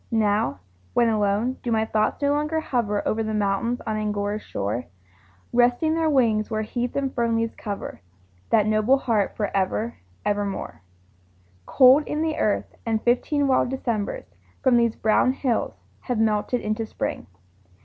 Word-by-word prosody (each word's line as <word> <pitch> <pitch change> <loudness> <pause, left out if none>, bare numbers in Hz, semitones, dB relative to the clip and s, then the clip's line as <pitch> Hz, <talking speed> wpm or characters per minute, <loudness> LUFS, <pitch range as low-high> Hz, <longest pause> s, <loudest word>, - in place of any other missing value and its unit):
Now, 210 - +1 0.3
when 235 -1 +4
alone, 215 +4 0
do 240 - -3
my 220 -1 +2
thoughts 220 +6 0
no 285 - +3
longer 300 +2 0
hover 230 -9 -1
Over 225 - 0
the 220 -1 -2
mountains 210 +4 0
on 215 -1 -2
Angora's 210 0 -2
shore, 105 - -3 0.7
Resting 245 +6 +3
their 325 -1 +1
wings, 230 -7 +2
where 220 -1 -1
heath 240 +3 -3
and 275 -1 -1
fern 235 -1 +1
leaves 225 0 -1
cover 205 -3 -6 0.5
That 215 -2 +4
noble 215 +5 +3
heart 225 -7 0
for 205 -2 -2
ever, 200 +4 -1 0.3
ever 205 0 +1
more? 195 - -5 0.9
Cold 265 +3 +6
in 300 +1 -1
the 315 -1 -1
earth, 210 - 0
and 225 -2 0
fifteen 280 +4 +1
wild 260 -2 +2
Decembers 240 - -3 0.4
From 260 -2 +4
these 235 -1 +3
brown 220 +4 +2
hills 260 -4 -1 0.2
have 245 -3 -3
melted 220 +2 +1
into 215 +1 -2
Spring. - - -4
225 Hz, 160 wpm, -24 LUFS, 210-255 Hz, 0.9 s, Cold